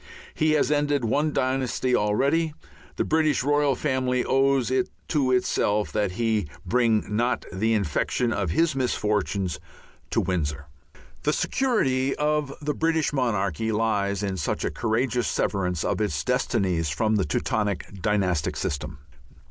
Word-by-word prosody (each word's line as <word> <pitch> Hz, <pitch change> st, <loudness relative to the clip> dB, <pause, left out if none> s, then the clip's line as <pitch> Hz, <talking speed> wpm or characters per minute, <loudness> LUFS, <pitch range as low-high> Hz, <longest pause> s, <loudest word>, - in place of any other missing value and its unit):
He 155 Hz, 0 st, +2 dB
has 150 Hz, -1 st, +2 dB
ended 145 Hz, -3 st, +1 dB
one 145 Hz, +7 st, +1 dB
dynasty 130 Hz, -2 st, 0 dB
already. 140 Hz, +9 st, +1 dB, 0.4 s
The -, -, 0 dB
British 155 Hz, -4 st, +2 dB
royal 145 Hz, -1 st, +2 dB
family 130 Hz, -2 st, 0 dB
owes 135 Hz, -2 st, +2 dB
it 130 Hz, -1 st, +1 dB, 0.2 s
to 135 Hz, -4 st, +1 dB
itself, 105 Hz, -4 st, +1 dB
that 105 Hz, -4 st, 0 dB
he 110 Hz, -4 st, 0 dB, 0.2 s
bring 115 Hz, +2 st, +2 dB
not 115 Hz, +4 st, 0 dB
the 110 Hz, +4 st, +1 dB
infection 110 Hz, -, 0 dB
of 100 Hz, -4 st, -1 dB
his 165 Hz, -, +2 dB
misfortunes 105 Hz, -, -1 dB, 0.5 s
to -, -, +1 dB
Windsor. 75 Hz, -6 st, -2 dB, 0.6 s
The -, -, +1 dB
security 135 Hz, -, +1 dB
of 150 Hz, -1 st, 0 dB
the 150 Hz, 0 st, -2 dB
British 160 Hz, -1 st, 0 dB
monarchy 110 Hz, -, 0 dB
lies 105 Hz, -2 st, 0 dB
in 95 Hz, -2 st, -2 dB
such -, -, -2 dB
a -, -, -1 dB
courageous 120 Hz, +1 st, 0 dB
severance 90 Hz, -4 st, -1 dB
of -, -, -1 dB
its 80 Hz, -8 st, -1 dB
destinies 95 Hz, -10 st, 0 dB
from 110 Hz, +8 st, +1 dB
the 100 Hz, -, +2 dB
Teutonic 100 Hz, +3 st, -2 dB
dynastic 95 Hz, -6 st, 0 dB
system. 70 Hz, +1 st, -3 dB
115 Hz, 140 wpm, -25 LUFS, 100-135 Hz, 0.6 s, He